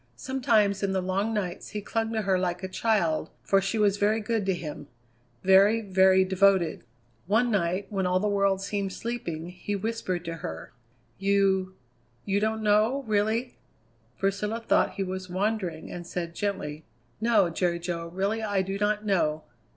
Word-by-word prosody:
Sometimes 220 Hz, -7 st, +1 dB
in 195 Hz, -1 st, 0 dB
the 190 Hz, -, +1 dB
long 190 Hz, +4 st, -1 dB
nights 195 Hz, -4 st, -3 dB
he 210 Hz, -, -4 dB
clung 225 Hz, +1 st, -1 dB
to 220 Hz, -1 st, -1 dB
her 190 Hz, -2 st, +2 dB
like 180 Hz, 0 st, -2 dB
a -, -, -2 dB
child, 185 Hz, -6 st, 0 dB
for 195 Hz, 0 st, +3 dB
she 195 Hz, +3 st, -1 dB
was 205 Hz, -2 st, +3 dB
very 210 Hz, +2 st, +2 dB
good 215 Hz, -2 st, -1 dB
to 190 Hz, -, +3 dB
him; 150 Hz, -4 st, -7 dB, 0.6 s
very, 195 Hz, +4 st, +5 dB
very 190 Hz, -2 st, +4 dB
devoted. 190 Hz, -5 st, +2 dB, 0.4 s
One 230 Hz, +5 st, +2 dB
night, 185 Hz, -1 st, 0 dB
when 190 Hz, -2 st, 0 dB
all 180 Hz, 0 st, +2 dB
the 210 Hz, -, 0 dB
world 195 Hz, -1 st, +1 dB
seemed 200 Hz, -1 st, -2 dB
sleeping, 175 Hz, -9 st, -4 dB
he 185 Hz, +3 st, -4 dB
whispered 195 Hz, -4 st, -3 dB
to 165 Hz, 0 st, -4 dB
her: 80 Hz, -, -7 dB, 0.5 s
"You 195 Hz, -1 st, +2 dB, 0.5 s
you 200 Hz, 0 st, +1 dB
don't 220 Hz, +1 st, -1 dB
know, 215 Hz, +6 st, +3 dB
really?" 220 Hz, +3 st, 0 dB, 0.6 s
Priscilla 205 Hz, +3 st, -1 dB
thought -, -, +3 dB
he 195 Hz, -, -1 dB
was 185 Hz, 0 st, -5 dB
wandering, 185 Hz, -3 st, -2 dB
and 175 Hz, -1 st, -7 dB
said 170 Hz, -2 st, -4 dB
gently: 165 Hz, -6 st, -3 dB, 0.4 s
"No, 215 Hz, -6 st, +3 dB
Jerry 170 Hz, 0 st, 0 dB
Jo, 170 Hz, -1 st, -4 dB
really 195 Hz, +6 st, -1 dB
I 205 Hz, -3 st, 0 dB
do 195 Hz, +1 st, -4 dB
not 210 Hz, 0 st, 0 dB
know." 155 Hz, -6 st, +1 dB
195 Hz, 165 wpm, -27 LUFS, 180-210 Hz, 0.6 s, very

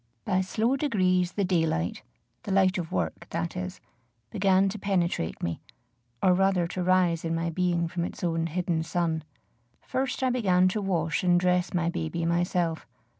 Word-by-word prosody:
By 185 Hz, 0 st, +2 dB
slow 225 Hz, +7 st, 0 dB
degrees 185 Hz, -, +1 dB
the 200 Hz, -, 0 dB
daylight, 160 Hz, -, 0 dB, 0.4 s
the 200 Hz, -, -6 dB
light 190 Hz, 0 st, +3 dB
of 165 Hz, -2 st, -5 dB
work, 85 Hz, -3 st, -3 dB
that 170 Hz, +1 st, -3 dB
is, 185 Hz, 0 st, -5 dB, 0.5 s
began 195 Hz, 0 st, +3 dB
to 210 Hz, +2 st, -6 dB
penetrate 180 Hz, -, -1 dB
me, 85 Hz, -1 st, -2 dB, 0.6 s
or 185 Hz, -, +5 dB
rather 190 Hz, -1 st, +2 dB
to 185 Hz, -, -3 dB
rise 180 Hz, -2 st, +2 dB
in 165 Hz, 0 st, -1 dB
my 165 Hz, 0 st, -1 dB
being 175 Hz, -1 st, 0 dB
from 170 Hz, 0 st, -3 dB
its -, -, -7 dB
own 165 Hz, -1 st, 0 dB
hidden 170 Hz, 0 st, -1 dB
sun. 165 Hz, -1 st, -1 dB, 0.6 s
First 260 Hz, 0 st, -2 dB
I 260 Hz, -, +3 dB
began 185 Hz, -7 st, +3 dB
to 210 Hz, +3 st, -2 dB
wash 165 Hz, -5 st, 0 dB
and 175 Hz, -1 st, +4 dB
dress 180 Hz, 0 st, +1 dB
my 170 Hz, -2 st, 0 dB
baby 165 Hz, 0 st, -3 dB
myself. 170 Hz, -1 st, 0 dB
180 Hz, 170 wpm, -27 LUFS, 165-190 Hz, 0.6 s, or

